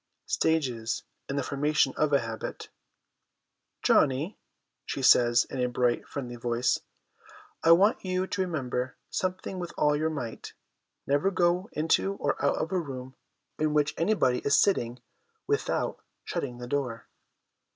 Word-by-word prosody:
Stages 125 -8 0 0.3
in 140 - -2
the 140 - 0
Formation 145 0 +1
of 155 -1 +1
a 140 - +4
Habit. 115 -1 -6 0.6
' - - -55
Johnny,' 145 +9 +2 0.4
she 135 - -4
says, 120 -2 +6
in 130 - -4
a 125 - +1
bright, 120 -1 0
friendly 125 -4 -6
voice, 120 +1 +1 0.4
' - - -22
I 165 - +8
want 200 +6 +4
you 185 0 0
to 190 0 -2
remember 130 -8 -2
something 185 0 -2
with 175 -1 -5
all 150 0 +3
your 155 +2 0
might: 125 -8 -6 0.5
never 145 +7 +2
go 180 +2 +1
into 165 +5 +1
or 145 -7 -2
out 140 - +3
of 160 - -2
a 185 - +1
room 130 -5 -6 0.5
in 155 0 +1
which 150 0 +2
anybody 165 -9 +2
is 140 - +3
sitting 120 -11 +2 0.5
without 430 +1 -1 0.2
shutting 140 -8 -3
the 120 - -7
door.' 125 -3 -2
145 Hz, 150 wpm, -28 LUFS, 125-170 Hz, 0.6 s, I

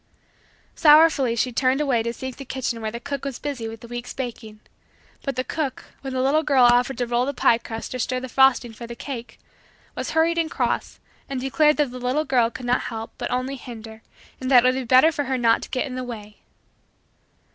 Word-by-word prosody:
Sorrowfully 300 -6 +5
she 250 +2 0
turned 255 +3 +1
away 270 -6 +1
to 235 +1 -2
seek 260 +1 -7
the 275 - -7
kitchen 255 -3 -3
where 220 - -2
the 235 +2 -6
cook 280 +2 -5
was 275 -3 -4
busy 275 -6 -4
with 225 0 -8
the 235 - -10
week's 240 +1 -7
baking. 230 -4 -6 0.6
But 275 -3 -3
the 255 - -1
cook, 275 -2 -4 0.2
when 270 -1 -5
the 255 0 0
little 290 +4 +3
girl 275 -4 +3
offered 245 +2 +3
to 245 - 0
roll 240 +2 0
the 280 - -3
pie 235 -1 +3
crust 225 +1 -7
or 255 - -4
stir 255 +2 -1
the 260 - -6
frosting 260 -2 +3
for 235 +1 -9
the 235 - -7
cake, 245 -2 -7 0.6
was - - -4
hurried 335 +1 +3
and 325 -1 0
cross - - -2 0.3
and 270 -2 -3
declared 300 +4 +3
that 295 -4 +1
the 250 - -7
little 255 +5 0
girl 245 -5 +2
could 245 +1 -9
not 245 +1 +2
help 225 0 -6
but - - -3
only 255 +2 -2
hinder 225 -3 -10 0.4
and 260 - -3
that 250 -3 +7
it - - +6
would - - +1
be - - -4
better 260 +6 +6
for 290 -2 -2
her 260 0 -1
not 230 -2 +3
to - - -8
get 255 - -1
in 265 - -6
the 255 0 -4
way. 215 -4 -8
255 Hz, 230 wpm, -23 LUFS, 235-275 Hz, 0.6 s, that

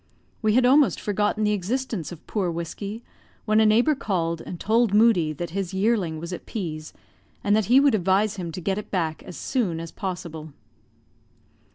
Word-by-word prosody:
We 215 -1 +2
had 250 0 +4
almost 275 +2 +4
forgotten 210 +1 0
the 210 - +2
existence 210 - -2
of 170 - -11
poor 195 -5 -1
Whiskey, 195 +7 -5 0.4
when 215 0 +3
a 220 - +5
neighbor 235 +8 +4
called 170 - -2
and 175 - -8
told 225 -1 +2
Moodie 210 -8 +4
that 170 +2 -5
his 190 0 -3
yearling 190 -5 +1
was 170 +3 -6
at 175 - -8
P 170 -9 -4
's, 155 - -11 0.5
and 205 0 +3
that 215 -1 +2
he 250 +7 +6
would 280 -2 +4
advise 195 +1 +2
him 175 -3 -4
to - - -5
get 195 +3 -1
it 210 - -9
back 165 -5 -2
as 180 - -10
soon 205 -11 -1
as 165 0 -7
possible. 170 -5 -6
195 Hz, 190 wpm, -24 LUFS, 170-220 Hz, 0.5 s, he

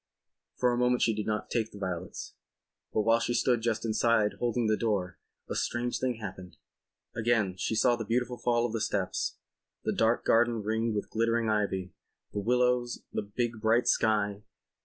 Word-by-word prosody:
For 125 -1 +2
a 120 - 0
moment 125 0 +3
she 115 - +3
did 105 0 -3
not 105 -1 -2
take 110 -2 0
the - - -11
violets. 90 -4 -5 0.6
But 110 - +1
while 115 +2 +4
she 120 +1 -1
stood 120 -2 +2
just 115 -1 -1
inside, 110 -1 +2
holding 120 -1 0
the 110 0 +3
door, 100 -5 -1 0.3
a - - -3
strange 120 +1 -1
thing 130 -1 0
happened.... 95 -5 -8 0.6
Again 110 -5 +1
she 105 +4 -2
saw 120 +2 +4
the 115 - -4
beautiful 120 +3 -1
fall 120 -1 +2
of 115 - -3
the 115 - -1
steps, 100 -3 -1 0.5
the - - 0
dark 115 +1 +2
garden 115 -1 +3
ringed 110 +1 0
with 105 - -3
glittering 115 0 +1
ivy, 95 -4 -1 0.4
the 105 - -1
willows, 125 +2 +1
the - - 0
big 110 +2 -3
bright 115 +2 +3
sky. 105 -2 +2
115 Hz, 180 wpm, -29 LUFS, 105-120 Hz, 0.6 s, while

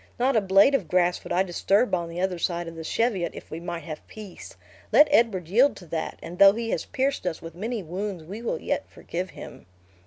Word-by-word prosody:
Not 260 +2 +2
a 220 - +4
blade 195 +7 +5
of 205 -11 +1
grass 180 +1 +1
would - - -9
I 185 - +3
disturb 195 +5 +1
on 170 -2 0
the 170 +1 -6
other 185 -1 -1
side 170 0 -1
of 165 - -8
the 165 - -7
Cheviot, 190 -2 0
if - - -11
we 160 - -5
might 170 0 -5
have 155 -3 -8
peace. 210 -4 -11 0.3
Let 300 - +7
Edward 220 - +3
yield 245 +10 +4
to 180 - -12
that, 160 0 -4
and 175 +1 -8
though 195 0 +9
he 230 +1 -3
has - - -1
pierced 270 -7 -1
us 165 - -2
with 165 -1 -9
many 215 +4 -4
wounds, 185 +1 -5
we 200 +8 -8
will 235 - -2
yet - - -3
forgive 180 +2 -5
him." - - -11
185 Hz, 230 wpm, -25 LUFS, 170-220 Hz, 0.3 s, though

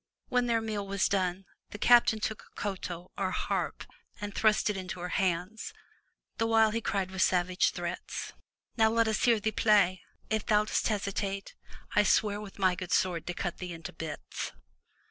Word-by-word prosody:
When 245 -1 +2
their 230 -1 +2
meal 210 -3 -3
was 200 0 +1
done, 185 -1 0 0.2
the - - -7
captain 235 -1 +5
took 220 0 -3
a - - -15
koto 180 -3 -4
or 190 -1 +1
harp 185 - -2 0.4
and 205 -1 -5
thrust 215 0 +3
it 210 - +1
into 185 -1 -5
her 180 +1 -4
hands, 185 +3 -1 0.6
the 225 - +2
while 225 -1 +4
he 230 +1 -1
cried 195 -4 -1
with 190 0 -2
savage 180 0 +3
threats: - - -5 0.4
"Now 220 -1 +4
let 230 0 +2
us 220 -2 +1
hear 235 -3 +4
thee 220 +1 0
play! 200 -4 +3 0.3
If 220 -1 -1
thou 210 0 +4
dost - - 0
hesitate, 200 -2 -2 0.4
I 210 - +7
swear 210 0 +2
with 205 -2 -10
my 190 -2 +3
good 180 0 -6
sword 170 -3 +1
to 180 - -3
cut 175 -2 -3
thee 180 -1 -5
into 165 0 -8
bits!" 160 -2 -6
200 Hz, 185 wpm, -30 LUFS, 185-220 Hz, 0.6 s, I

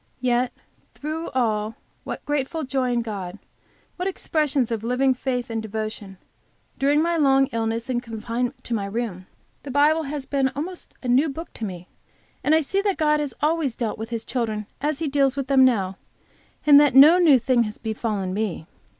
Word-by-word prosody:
Yet 245 0 +1 0.4
through 310 +3 -4
it - - -10
all 220 -3 0 0.3
what - - -6
grateful 295 +2 -2
joy 260 -2 -1
in 235 -1 0
God, 195 -5 -6 0.6
what 360 +1 -2
expressions 295 -9 0
of 225 -2 -2
living 255 +3 +2
faith 250 -1 -3
and 225 0 -2
devotion! 215 -2 -5 0.6
During 290 +3 +3
my 340 0 +1
long 270 -3 +4
illness 225 0 -2
and 245 -2 -1
confinement 235 +2 -4
to 240 - -4
my 200 -3 -1
room, 200 -4 -4 0.3
the 285 - -9
Bible 295 +4 +3
has 285 -2 -4
been 275 -1 +1
almost 345 +6 -6
a - - -4
new 265 +6 +3
book 325 +5 -7
to 225 - -5
me, 180 -3 -7 0.6
and 310 - +4
I 320 - +4
see 390 +7 0
that 400 -2 0
God 300 -1 +2
has 290 -3 -3
always 305 -5 +1
dealt 225 -3 -3
with 225 +1 -5
His 230 -1 -4
children 220 -4 -2 0.2
as 295 0 0
He 320 - -2
deals 275 -1 +2
with 275 -1 -2
them 270 -1 +5
now, 195 -7 +1 0.7
and 290 -1 +8
that 290 -3 +4
no 305 +6 +9
new 315 -7 +6
thing 245 0 +2
has 210 0 -6
befallen 215 -4 -3
me. 200 -6 -3
255 Hz, 190 wpm, -23 LUFS, 225-290 Hz, 0.7 s, no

